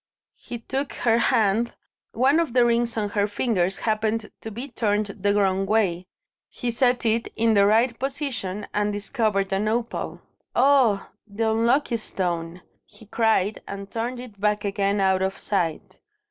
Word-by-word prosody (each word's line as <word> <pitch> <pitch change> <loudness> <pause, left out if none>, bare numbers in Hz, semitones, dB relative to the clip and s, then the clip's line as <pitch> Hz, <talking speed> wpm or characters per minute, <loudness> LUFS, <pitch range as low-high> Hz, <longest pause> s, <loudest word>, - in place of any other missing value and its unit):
He 240 - -7
took 265 +4 -4
her 230 -1 +2
hand. 225 0 +2 0.4
One 270 +7 +3
of 330 -8 -1
the 245 -1 +5
rings 235 0 +1
on 210 -2 0
her 205 -1 +1
fingers 200 -4 0
happened 220 0 -1
to 220 - -6
be 235 +6 -6
turned 215 -3 0
the 200 0 -1
wrong 195 -1 +1
way. 190 -4 +1 0.4
He 245 - -3
set 245 0 +2
it 225 +1 +1
in 225 0 +2
the 200 -1 +5
right 230 +3 +2
position, 260 -8 -3
and 210 0 +1
discovered 205 -2 -1
an 200 +2 0
opal. 230 +2 -2 0.4
"Ah! 250 -6 +3 0.2
the 220 +2 -1
unlucky 235 +3 +2
stone!" 175 -4 -3 0.2
he 220 - -18
cried, 220 -2 +1
and 200 0 -7
turned 240 +2 -3
it 220 -6 -11
back 210 0 +1
again 200 0 0
out 190 -1 +2
of 190 0 -1
sight. 175 -6 -2
215 Hz, 160 wpm, -24 LUFS, 200-235 Hz, 0.4 s, the